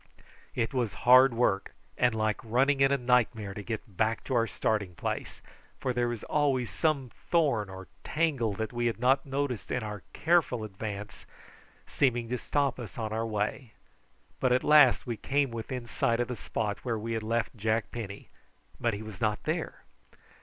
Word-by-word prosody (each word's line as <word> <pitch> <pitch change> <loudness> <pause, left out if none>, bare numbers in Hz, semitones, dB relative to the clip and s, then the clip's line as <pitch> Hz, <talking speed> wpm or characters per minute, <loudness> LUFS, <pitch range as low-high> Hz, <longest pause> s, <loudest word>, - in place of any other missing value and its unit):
It 115 0 -1
was 120 -5 -1
hard 130 +2 +8
work 105 -5 +1 0.2
and 120 -2 +2
like 110 +2 0
running 135 +5 +2
in 135 0 +5
a 140 - +3
nightmare 120 -5 +1
to 105 - -6
get 110 -2 -6
back 110 0 +1
to 130 - -4
our 115 -2 +3
starting 100 -4 -1
place, - - -4 0.4
for 130 - -1
there 120 0 +1
was 120 -3 -4
always 135 -5 +1
some 140 -6 0 0.2
thorn 140 - +2
or 95 0 -9 0.2
tangle 145 -9 0
that 110 +4 -4
we 120 0 0
had 115 - -2
not 135 +3 +3
noticed 135 -3 -2
in 125 - -1
our 105 -2 -5
careful 165 -9 +2
advance 105 0 -7 0.6
seeming 120 -4 +1
to 125 0 -2
stop 140 -1 0
us 115 -6 -8
on 110 -2 -3
our 115 +1 -1
way; 110 +2 -2 0.7
but 130 - +2
at 125 - +3
last 150 -4 +6
we 120 -2 -3
came 140 +1 0
within 120 +2 -5
sight 115 0 0
of 120 - 0
the 125 - -2
spot 105 -1 -3
where 115 -3 -1
we 115 +2 -3
had 110 - -1
left 115 +3 -1
Jack 110 +1 0
Penny, 100 -4 -7 0.5
but 115 -3 +1
he 105 - -6
was 110 -4 -10
not 105 -1 0
there. - - -3
115 Hz, 180 wpm, -29 LUFS, 110-130 Hz, 0.7 s, hard